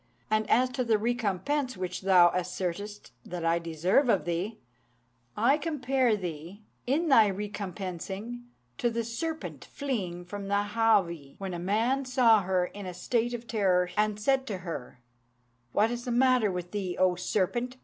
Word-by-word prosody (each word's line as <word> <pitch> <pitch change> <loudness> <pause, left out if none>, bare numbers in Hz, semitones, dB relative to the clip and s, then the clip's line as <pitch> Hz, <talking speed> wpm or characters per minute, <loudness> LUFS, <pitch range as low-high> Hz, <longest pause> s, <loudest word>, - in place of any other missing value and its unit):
And 215 0 +1
as 255 +2 +4
to 255 0 -1
the 225 -2 +3
recompense 240 - -1
which 180 -1 -4
thou 180 -3 +6
assertest 185 +3 -4
that 175 -1 -5
I 165 +1 +3
deserve 170 - +1
of 200 - +2
thee, 175 +6 -2 0.8
I 265 +7 +3
compare 265 -7 +1
thee, 175 +2 -7 0.2
in 305 +7 +1
thy 225 -7 +6
recompensing, 200 +3 -5 0.3
to 240 - +2
the 230 0 -2
serpent 315 +8 -5
fleeing 190 -11 -4
from 200 +2 -6
the 200 +1 0
Háwee, 190 -11 +2
when 195 -2 -5
a 175 - -4
man 230 +9 +1
saw 240 -4 +5
her 185 -1 +1
in 200 +1 -8
a 180 - -6
state 240 +5 0
of 235 0 -8
terror, 185 -6 +1
and 210 0 +1
said 265 +4 +1
to 205 -5 -3
her, 125 -7 -6 0.7
'What 215 - +2
is 240 0 -4
the 245 - -2
matter 250 -3 +3
with 180 -1 -5
thee, 190 -4 -3
O 185 -1 +4
serpent?' 215 +8 -1
210 Hz, 160 wpm, -29 LUFS, 180-240 Hz, 0.8 s, thou